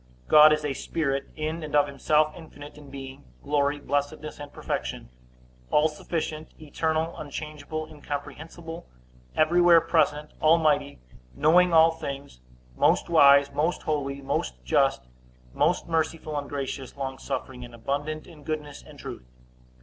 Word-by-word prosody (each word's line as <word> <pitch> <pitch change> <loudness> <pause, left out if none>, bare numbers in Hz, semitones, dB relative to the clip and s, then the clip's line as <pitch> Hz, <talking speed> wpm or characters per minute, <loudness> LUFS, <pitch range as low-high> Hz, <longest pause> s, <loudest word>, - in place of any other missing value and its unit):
God 155 0 +8
is 150 0 +1
a 145 - -1
Spirit, 135 -1 -2
in 155 +2 -3
and 150 -1 -4
of 145 -1 +5
himself 150 +2 +1
infinite 150 -3 -12
in 150 -2 -13
being, 135 -1 -9 0.2
glory, 145 0 +1
blessedness, 145 +2 -3
and 145 0 -8
perfection; - - -4 0.6
all 150 +1 +4
sufficient, 155 0 -4
eternal, 160 +2 -2
unchangeable, 155 +1 -6
incomprehensible, 160 +3 -8 0.5
everywhere 170 +2 +5
present, 150 -2 +1
almighty, 155 -3 +3 0.4
knowing 175 +4 +4
all 165 0 +6
things, 140 - -7 0.4
most - - +2
wise, 140 -3 +6
most 155 +5 0
holy, 140 -2 -2
most 60 - -3
just, 60 0 +2 0.5
most 170 +5 +1
merciful 160 -1 -1
and 145 -1 -3
gracious, 135 -2 -5
longsuffering, 130 -1 -5
and 120 -1 -11
abundant 145 +6 -3
in 165 -4 -14
goodness 150 -2 -5
and - - -15
truth. 60 0 -9
150 Hz, 130 wpm, -26 LUFS, 140-160 Hz, 0.6 s, God